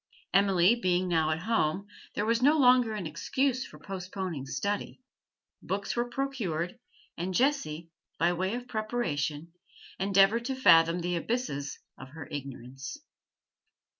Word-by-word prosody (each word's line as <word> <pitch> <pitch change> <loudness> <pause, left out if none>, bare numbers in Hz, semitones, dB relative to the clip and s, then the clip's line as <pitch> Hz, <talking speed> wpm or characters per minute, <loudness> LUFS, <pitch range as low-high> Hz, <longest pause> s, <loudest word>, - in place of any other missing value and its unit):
Emily 195 0 +5
being 185 -5 +1
now 160 -3 +2
at 155 +1 -1
home, 200 -4 +1 0.3
there 210 - 0
was 230 +1 +1
no 295 +4 +5
longer 250 -5 +5
an 195 -4 -4
excuse 260 - -1
for - - -13
postponing 185 -6 -5
study; 200 - -3 0.6
books 200 +1 -3
were 240 0 -1
procured, 235 - -3 0.4
and 180 +2 -2
Jessie, 170 - 0 0.3
by 170 +2 +2
way 190 +5 -1
of 245 0 -6
preparation, 170 - -2 0.5
endeavoured 195 +4 +4
to 265 +1 -2
fathom 165 -8 +5
the 175 +1 -1
abysses 170 - -3 0.2
of 130 - -10
her 155 -3 -8
ignorance. 135 - -7
190 Hz, 135 wpm, -29 LUFS, 165-235 Hz, 0.6 s, Emily